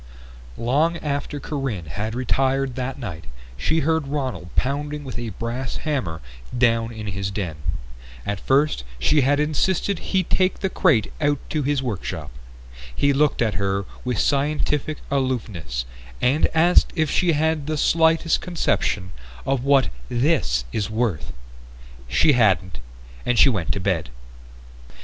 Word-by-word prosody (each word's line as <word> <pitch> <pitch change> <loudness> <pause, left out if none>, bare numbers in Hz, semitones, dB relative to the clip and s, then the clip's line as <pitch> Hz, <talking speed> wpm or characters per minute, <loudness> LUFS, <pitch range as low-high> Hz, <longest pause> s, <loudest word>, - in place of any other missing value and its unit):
Long 150 +8 +2
after 145 -1 -3
Corinne 135 - -3
had 105 +9 -4
retired 135 +1 +1
that 130 +2 -3
night 90 - -6 0.3
she 160 - +1
heard 160 0 +1
Ronald 130 - -3
pounding 145 +2 -1
with 130 -3 -6
a 120 -1 -4
brass 120 +6 -4
hammer 130 - -2 0.4
down 115 -1 +3
in 110 -2 -7
his 100 -1 -3
den. 95 -6 -4 0.7
At 100 -1 -2
first 135 - +2
she 145 - +3
had 145 +2 +3
insisted 170 +5 +1
he 190 -1 0
take 185 +2 +1
the 190 -1 0
crate 140 - +2
out 145 -1 +3
to 155 - 0
his 140 -1 0
workshop. 110 -8 -4 0.6
He 140 0 +3
looked 145 -3 +2
at 110 -2 0
her 100 0 0 0.2
with 125 -3 -1
scientific 150 +3 +1
aloofness 105 - -2 0.3
and 135 +5 +3
asked 170 +3 +5
if 155 -3 +1
she 175 -2 +3
had 155 -1 0
the 155 0 -1
slightest 160 +1 +3
conception 105 - 0 0.3
of 135 -2 0
what 140 -1 +4 0.2
"this 120 - +1
is 105 -2 -1
worth?" 110 -7 -1 0.8
She 150 - +4
hadn't, 95 - +2 0.4
and 125 -1 +1
she 125 - +7
went 95 -10 -1
to - - -3
bed. 90 -5 -1
130 Hz, 140 wpm, -23 LUFS, 105-150 Hz, 0.8 s, she